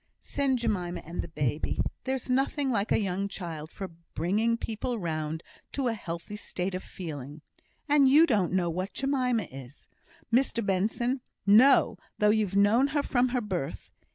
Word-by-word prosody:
"Send 275 -2 0
Jemima 180 -7 -2
and 170 +3 -4
the - - -6
baby. 150 -2 -2 0.3
There's 265 -1 -2
nothing 270 +2 +1
like 205 -3 0
a - - +5
young 195 -1 -1
child 165 -6 -6
for 190 +3 -6 0.3
bringing 215 +8 +1
people 230 +2 -3
round 160 -3 -3 0.3
to 270 -3 0
a - - 0
healthy 185 0 -6
state 185 -2 -3
of 185 - -3
feeling; 150 -4 -8 0.4
and 285 -2 +5
you 305 +5 +7
don't 210 - +1
know 180 -1 +1
what 185 +4 -3
Jemima 255 -5 +1
is, 135 -3 -12 0.4
Mr 240 -3 +2
Benson! 225 +7 0 0.2
No! 235 +7 +6 0.2
though 210 0 +4
you've 210 -3 +1
known 210 +7 +5
her 285 - +2
from 250 -2 +2
her 250 0 0
birth. 185 -10 -4
205 Hz, 160 wpm, -28 LUFS, 175-250 Hz, 0.4 s, you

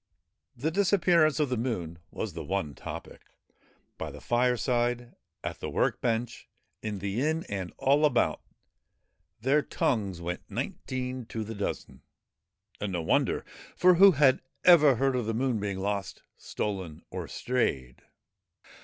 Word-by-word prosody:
The 150 +7 -1
dis 195 +2 +2
appearance 170 -6 +4
of 150 -3 +2
the 125 - 0
Moon 90 -9 -3
was - - -5
the - - -5
one 75 -2 -2
topic. - - -8 0.8
By - - -3
the - - -10
fireside, 120 0 +1 0.3
at - - -4
the - - -4
work - - 0
bench, 120 0 -2 0.3
in 105 -2 -3
the 100 +4 -2
inn 160 +3 0
and 95 -3 -4
all 140 +3 +3
about, 145 -6 +2 1.0
their 135 +5 +3
tongues 100 -11 -1
went 85 +1 -4
nineteen 130 -2 -4
to 110 -2 -4
the 110 +1 -6
dozen; 100 -2 -5 0.8
and 100 -2 -3
no 85 -2 -1
wonder, - - +1 0.3
for 180 0 +6
who 195 +2 +8
had 140 -3 +4 0.2
ever 155 -6 +7
heard 135 +2 +1
of 120 -3 -1
the 115 - -1
Moon 125 -2 0
being 100 -2 -3
lost, 100 0 -3
stolen 95 -7 -4
or - - -5
strayed 70 - -2
120 Hz, 145 wpm, -28 LUFS, 100-140 Hz, 1.0 s, who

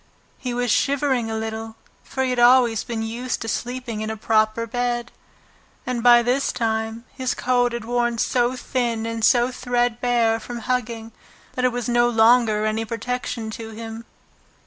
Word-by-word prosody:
He 250 - -4
was 245 -1 0
shivering 270 -4 +1
a 220 - -2
little, 220 0 -5 0.3
for 265 - -3
he 260 - 0
had 250 - -1
always 240 -2 +5
been 225 -2 -4
used 235 +3 -3
to - - -6
sleeping 245 -1 -3
in 215 - -3
a 220 - -4
proper 215 +1 +1
bed, 240 0 -2 0.7
and 250 -2 -2
by 240 0 +7
this 255 +3 +1
time 225 0 -2
his 260 -1 -2
coat 245 -1 +1
had 235 -1 -5
worn 240 0 0
so 245 +2 +1
thin 240 -3 -2
and 230 -1 -4
threadbare 245 -1 +2
from 240 +1 -7
hugging 230 -2 -2 0.4
that 255 -1 -1
it 250 - +3
was 245 -1 -3
no 240 0 +3
longer 225 -2 +4
any 215 +1 0
protection 230 0 -4
to 225 0 -7
him. 225 +1 -8
240 Hz, 165 wpm, -22 LUFS, 225-245 Hz, 0.7 s, by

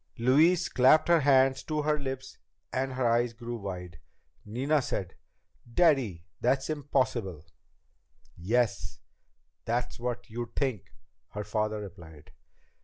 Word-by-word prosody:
Louise 155 +9 +4
clapped 130 +5 +5
her 170 -1 +6
hand 135 -2 +4
to 155 -1 -1
her 150 0 +1
lips 130 -1 -6 0.3
and 130 0 -1
her 130 -1 0
eyes 120 0 +2
grew 120 +1 -6
wide. 90 -7 -7 0.4
Nina 135 +8 0
said, 95 -7 -4 0.6
"Daddy! 125 - +2
That's 135 +4 +1
impossible!" 130 - -1 0.9
"Yes, 115 +6 0 0.7
that's 120 +2 -2
what 120 0 -4
you'd 120 0 -6
think," 130 -9 -2 0.4
her 105 - -4
father 105 0 -2
replied. 85 -7 -12
120 Hz, 115 wpm, -29 LUFS, 105-135 Hz, 0.9 s, her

